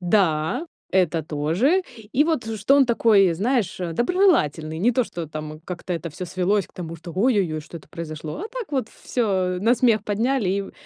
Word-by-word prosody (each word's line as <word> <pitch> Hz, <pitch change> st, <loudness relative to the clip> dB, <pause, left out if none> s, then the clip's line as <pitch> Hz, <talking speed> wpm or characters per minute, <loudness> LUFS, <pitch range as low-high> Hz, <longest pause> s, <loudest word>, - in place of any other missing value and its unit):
Да, 180 Hz, -, +1 dB, 0.3 s
это 170 Hz, -4 st, +2 dB
тоже. 170 Hz, -, +1 dB, 0.3 s
И 290 Hz, +4 st, +4 dB
вот 320 Hz, -7 st, 0 dB
что 245 Hz, +8 st, +4 dB
он 275 Hz, -2 st, +5 dB
такой, 210 Hz, -6 st, +4 dB
знаешь 210 Hz, 0 st, 0 dB
э, 170 Hz, -2 st, -3 dB
доброжелательный. 165 Hz, -, +2 dB
Не 235 Hz, +7 st, +3 dB
то, 250 Hz, +1 st, +2 dB
что 170 Hz, -6 st, -6 dB
там 155 Hz, 0 st, -7 dB
как-то 180 Hz, 0 st, -5 dB
это 170 Hz, -1 st, -5 dB
всё 180 Hz, +5 st, -6 dB
свелось 185 Hz, +2 st, 0 dB
к -, -, -29 dB
тому, 165 Hz, -2 st, -6 dB
что 170 Hz, +2 st, -10 dB
ой-ой-ой, 190 Hz, -7 st, +1 dB
что 165 Hz, +3 st, -10 dB
это -, -, -21 dB
произошло, 155 Hz, -, -6 dB
а -, -, -6 dB
так -, -, -7 dB
вот 260 Hz, -5 st, -1 dB
всё, 245 Hz, -2 st, -3 dB, 0.3 s
э, -, -, -3 dB
на 230 Hz, +4 st, +4 dB
смех 225 Hz, -4 st, +2 dB
подняли, 225 Hz, +2 st, 0 dB
и, 200 Hz, +1 st, 0 dB
в 195 Hz, -, -10 dB
190 Hz, 200 wpm, -23 LUFS, 165-245 Hz, 0.3 s, он